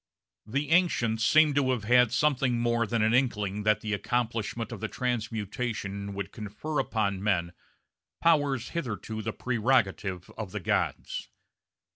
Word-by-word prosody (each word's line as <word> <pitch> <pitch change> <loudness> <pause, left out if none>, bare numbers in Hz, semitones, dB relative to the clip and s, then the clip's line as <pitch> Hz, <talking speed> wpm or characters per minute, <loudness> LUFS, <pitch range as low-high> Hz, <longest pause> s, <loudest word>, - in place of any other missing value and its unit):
The 140 +7 -2
ancients 120 -11 +2
seem 155 +4 +5
to 140 -2 +2
have 125 -5 0
had 125 +1 +5
something 130 -1 +2
more 120 -1 +1
than 115 +1 +1
an 110 +1 +3
inkling 105 -6 +1
that 105 0 +2
the 105 -1 -2
accomplishment 115 +1 -2
of 115 - -7
transmutation 110 -4 -3
would 100 0 -4
confer 110 +9 -4
upon 100 -4 -1
men 90 -4 0 0.7
powers 145 -7 +2
hitherto 110 -8 -4
the 110 +1 -3
prerogative 105 -7 0
of 105 -3 -5
the 105 - -2
gods. 90 - -2
115 Hz, 135 wpm, -28 LUFS, 105-125 Hz, 0.7 s, seem